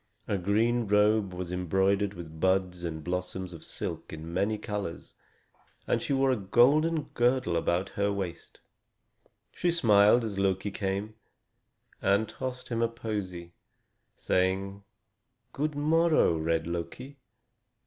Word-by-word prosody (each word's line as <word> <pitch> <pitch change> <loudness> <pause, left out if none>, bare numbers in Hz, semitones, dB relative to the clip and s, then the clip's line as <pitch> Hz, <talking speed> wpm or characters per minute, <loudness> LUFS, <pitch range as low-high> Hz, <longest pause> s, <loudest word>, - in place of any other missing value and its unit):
Her 100 -3 0
green 110 +5 +1
robe 105 0 +3
was 90 -1 -5
embroidered 95 +3 +1
with 80 -2 -9
buds 95 -1 +1
and 80 -2 -4
blossoms 90 +1 -4
of 80 - -10
silk - - -5
in 80 +1 -7
many 100 +4 +1
colors, 105 -5 -5 0.7
and - - 0
she - - -4
wore 135 -1 +3
a - - +2
golden 140 +10 +3
girdle 120 -6 +2
about 85 +3 0
her 100 0 0
waist. 95 -4 -5 0.9
She 175 - 0
smiled 110 -7 +5
as 105 -3 -3
Loki 95 +1 0
came, 100 +2 -3 0.9
and 100 +3 +2
tossed 130 +1 -6
him 115 -1 -1
a 115 - +3
posy, 100 -7 -5 0.6
saying: 95 +2 0 0.7
"Good 150 +1 -2
morrow, 155 - +3
red 80 +1 0
Loki. 85 +12 -5
100 Hz, 130 wpm, -29 LUFS, 90-115 Hz, 0.9 s, smiled